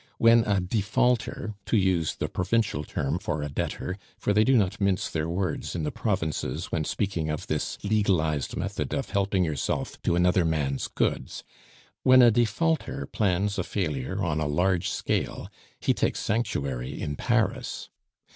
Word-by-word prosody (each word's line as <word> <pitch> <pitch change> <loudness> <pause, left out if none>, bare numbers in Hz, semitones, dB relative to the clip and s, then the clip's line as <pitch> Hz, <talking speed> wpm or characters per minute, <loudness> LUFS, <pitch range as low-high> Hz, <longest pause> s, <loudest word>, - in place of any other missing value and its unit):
When 115 0 +6
a 100 -2 +2
defaulter 110 +3 0
to 115 - +3
use 95 -5 +1
the - - -2
provincial 95 -4 0
term 75 +2 -2
for 80 -5 -2
a 75 - -3
debtor, 90 +6 -3 0.2
for 105 - 0
they 105 +1 +5
do 130 +2 +4
not 100 0 0
mince 100 -1 +1
their 80 0 -1
words 90 -1 -2
in 85 - -2
the 75 - -1
provinces 80 - -2
when 80 -2 0
speaking 85 -6 -1
of 75 0 -3
this - - -2
legalized 95 -8 +1
method - - -2
of - - -3
helping 100 -1 +1
yourself 75 -4 -2
to - - +1
another 90 +1 +3
man's 75 -4 0
goods - - -2 0.6
when 130 0 +7
a 120 - +7
defaulter 120 - 0
plans 100 +3 0
a - - +1
failure 90 0 -2
on 80 -3 0
a 75 - 0
large 90 +4 +1
scale, - - -2 0.3
he - - +2
takes - - 0
sanctuary 70 - -2
in 75 - -3
Paris. - - -1
90 Hz, 160 wpm, -27 LUFS, 80-105 Hz, 0.6 s, when